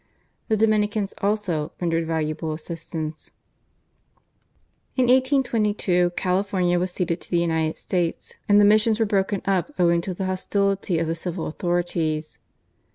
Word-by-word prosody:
The 220 - +2
Dominicans, 210 -1 +1
also, 195 -7 -1
rendered 165 -2 0
valuable 155 -1 -2
assistance. 160 -1 -6 1.7
In 255 - +3
1822 230 -9 +2
California 185 -1 +1
was 180 +1 -1
ceded 175 -1 -2
to - - -8
the 175 - +1
United 160 -2 0
States, 175 -3 -2 0.2
and 205 0 +6
the 205 - +6
missions 215 +1 +4
were 225 - +3
broken 200 -1 0
up 195 +5 0
owing 170 -1 +3
to 185 +1 -4
the 190 - -3
hostility 195 0 0
of 165 - 0
the 160 - -1
civil 170 0 -4
authorities. 160 -5 -2
180 Hz, 135 wpm, -24 LUFS, 165-205 Hz, 1.7 s, and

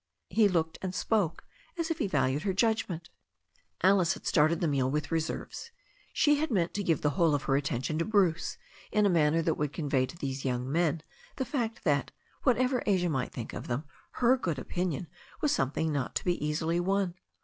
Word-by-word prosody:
He 220 -2 +5
looked 165 -4 0
and 185 -1 -4
spoke 185 -3 0 0.3
as 335 -1 -1
if 330 - -2
he 250 - +1
valued 135 -4 +1
her 195 +2 0
judgment, 195 -6 0 0.7
Alice 190 -2 +4
had - - -13
started 160 +2 +3
the 170 - +1
meal 135 -3 +1
with 150 +3 -2
reserves. 165 - -3 0.4
She 295 -1 +3
had 310 +2 -1
meant 180 -8 +1
to 205 - -2
give 165 -4 +1
the 150 - +2
whole 160 +1 +3
of 140 - -2
her 135 - +1
attention 140 +2 -1
to 165 - +1
Bruce 190 -7 +1 0.3
in 210 -1 +3
a - - +4
manner 165 -1 +3
that 160 -1 0
would 150 -1 -1
convey 140 -5 0
to 170 - -11
these 135 -3 -4
young 125 0 -2
men 165 -1 +1 0.3
the 265 - -2
fact 235 -4 -3
that, 140 -5 +1 0.3
what 250 -3 +3
ever 255 0 +1
Asia 185 -4 +2
might 130 -5 -1
think 115 - -6
of - - -6
them, 125 +4 -2 0.3
her 250 +1 +4
good 170 - -2
opinion 175 +2 -2 0.3
was 300 - +1
something 145 +4 0
not 140 -3 -2
to - - -2
be 175 -4 0
easily 160 +3 0
won. 190 0 +1
165 Hz, 205 wpm, -30 LUFS, 145-200 Hz, 0.7 s, He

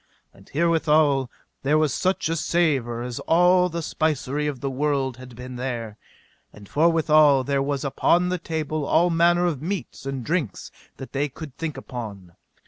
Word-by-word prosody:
And 95 - -19
herewithal 155 -4 +2 0.3
there 145 +3 +2
was 155 -4 +2
such 185 -2 0
a 165 - -1
savour 140 -9 0
as 125 -1 -5
all 180 +2 +4
the 170 -1 -4
spicery 150 -2 -1
of 140 -4 -3
the 140 - -3
world 135 -2 -1
had 125 -1 -12
been 125 +1 -8
there. 115 -4 -4 0.5
And 105 -1 -14
forthwithal 155 - +4
there 140 0 +1
was 140 0 -2
upon 175 +6 +2
the 180 0 -1
table 155 -1 -3
all 170 +4 +3
manner 175 +1 +3
of 155 -6 -1
meats 180 -5 -5
and 135 -3 -4
drinks 155 - -2 0.3
that 135 - -9
they 145 +2 0
could 145 0 -10
think 155 -3 -4
upon. 105 -9 -8
145 Hz, 165 wpm, -24 LUFS, 130-165 Hz, 0.5 s, all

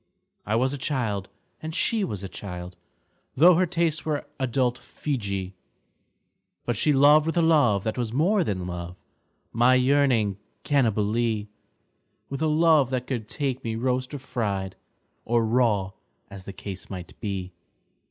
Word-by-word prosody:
I 105 - +1
was 130 +4 +1
a 145 - -5
child, 110 -9 -2 0.3
and 160 0 -5
she 225 -3 +1
was 105 - -4
a - - -4
child 90 -2 -7 0.3
— - - -44
Tho' 170 +7 +7
her 180 +2 +2
tastes 165 -2 0
were 150 -2 -2
adult 125 -1 0
Feejee 100 -9 -4 0.5
— - - -51
But 120 - 0
she 150 - +2
loved 145 +2 +6
with 165 - -1
a - - +5
love 140 - +4
that 110 +2 -2
was 115 -3 -2
more 180 - +2
than 95 - -3
love, 90 0 -6 0.6
My 120 +3 +5
yearning 125 -7 +2 0.2
Cannibalee; 110 -4 +1 0.8
With 140 +1 -5
a 160 - +2
love 155 -3 +4
that 130 -1 -2
could 120 -5 -4
take 135 -3 -2
me 115 -1 -2
roast 125 +2 -1
or - - -3
fried 105 -8 -3 0.5
Or 115 -1 +1
raw, 110 -5 +2 0.4
as 95 -1 -10
the - - -6
case 95 -1 -7
might 90 -2 -7
be. 95 -4 -4
120 Hz, 160 wpm, -25 LUFS, 100-145 Hz, 0.8 s, Tho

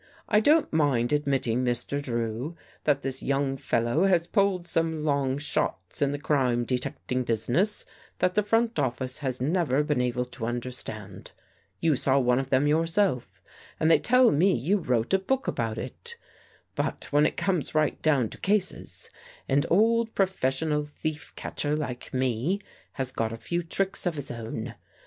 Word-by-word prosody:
" - - -28
I 210 - +4
don't 300 - +3
mind 140 -5 +2
admit 140 -3 +1
ting, 120 +2 +1
Mr. 125 +3 -1
Drew, 120 +4 -3 0.3
that 140 -2 +2
this 135 -1 -1
young 135 0 0
fellow 120 +6 +1
has 175 -3 +3
pulled 190 -2 +1
some 160 -2 0
long 140 -2 +1
shots 145 - -2
in 140 -1 +2
the 145 - -2
crime 130 -5 +1
detecting 125 +1 -2
business 120 - +1 0.3
that 180 0 +1
the 210 - +3
front 225 0 +1
office 130 0 -1
has 130 -4 -2
never 150 0 +1
been 150 -4 0
able 125 0 -1
to 120 -2 -5
understand. 120 +1 -5 0.5
lYou 160 -3 +4
saw 135 +1 +2
one 125 -1 +3
of 135 0 -4
them 135 +1 +3
yourself, 155 - 0 0.4
and 160 +1 +3
they - - +6
tell 250 0 +5
me 180 +6 +3
you 180 - +1
wrote 125 -5 0
a 195 - +5
book 265 +8 -1
about 115 -2 -2
it. 470 - -6 0.6
But - - -3
when 150 +1 +5
it - - -5
comes 180 -7 0
right 155 -2 +1
down 140 -8 +2
to - - -9
cases, 200 -1 0 0.4
an 140 +1 +3
old 225 +4 +3
professional 150 -5 +1
thief 150 +1 -5
catcher 145 0 -2
like 125 -5 -5
me 130 - 0 0.3
has 130 -2 -1
got 115 -3 -1
a 115 - -5
few 170 +8 -2
tricks 190 +3 +1
of 170 - -1
his 145 -2 -1
own. 115 -1 -5
145 Hz, 170 wpm, -27 LUFS, 125-175 Hz, 0.6 s, they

